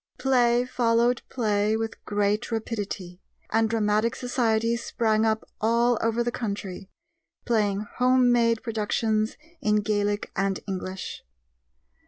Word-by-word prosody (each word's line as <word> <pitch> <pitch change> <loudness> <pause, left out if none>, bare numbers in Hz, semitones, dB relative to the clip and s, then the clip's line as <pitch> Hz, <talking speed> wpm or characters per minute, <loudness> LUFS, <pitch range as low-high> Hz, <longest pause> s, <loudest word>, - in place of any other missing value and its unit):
Play 245 -2 +3
followed 240 0 +2
play 215 -2 +1
with 225 -1 -5
great 205 +2 0
rapidity, 205 -5 -4 0.3
and 225 0 +2
dramatic 215 +1 +1
societies 235 -2 0
sprang 220 -1 +1
up 220 0 -1
all 235 +1 +3
over 230 +1 +1
the 240 - -1
country, 200 -4 -5 0.6
playing 210 -4 +1
home 250 +3 +2
made 230 -2 +2
productions 220 -1 0 0.2
in 210 0 +2
Gaelic 205 0 -1
and 195 -1 0
English. 190 -1 -5
220 Hz, 115 wpm, -26 LUFS, 205-235 Hz, 0.6 s, Play